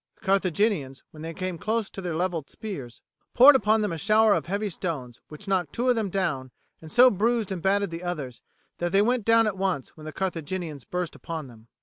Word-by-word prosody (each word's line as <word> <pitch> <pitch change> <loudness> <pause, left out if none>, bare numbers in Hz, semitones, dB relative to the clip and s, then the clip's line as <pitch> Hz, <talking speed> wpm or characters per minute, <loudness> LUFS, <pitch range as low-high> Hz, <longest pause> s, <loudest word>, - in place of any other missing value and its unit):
The - - -22
Carthaginians, 190 -7 +1
when 155 - -12
they 165 +1 -5
came 185 0 -4
close 220 +1 -1
to 195 - -7
their 175 -3 -3
levelled 170 -4 -2
spears, 170 - -8 0.3
poured 270 +3 +9
upon 220 -2 +3
them 210 -3 -1
a 165 - -4
shower 215 +5 +4
of - - -1
heavy 200 +3 -1
stones, 140 -9 -5
which 155 +7 -11
knocked 180 -6 0
two 250 +2 0
of 250 - +4
them 220 -3 -1
down 160 -9 -2 0.3
and 160 -1 -10
so 250 +6 +7
bruised 220 +1 0
and 185 -3 -3
battered 200 0 +1
the 165 +1 -6
others 145 -10 -5 0.4
that 175 0 -1
they 200 +1 +5
went 240 -1 +1
down 230 0 +5
at 210 -3 -2
once 185 -9 -2
when 155 - -12
the 155 - -5
Carthaginians 165 -4 -4
burst 180 -2 -3
upon 160 -3 -6
them. 115 -3 -15
185 Hz, 220 wpm, -26 LUFS, 160-210 Hz, 0.4 s, poured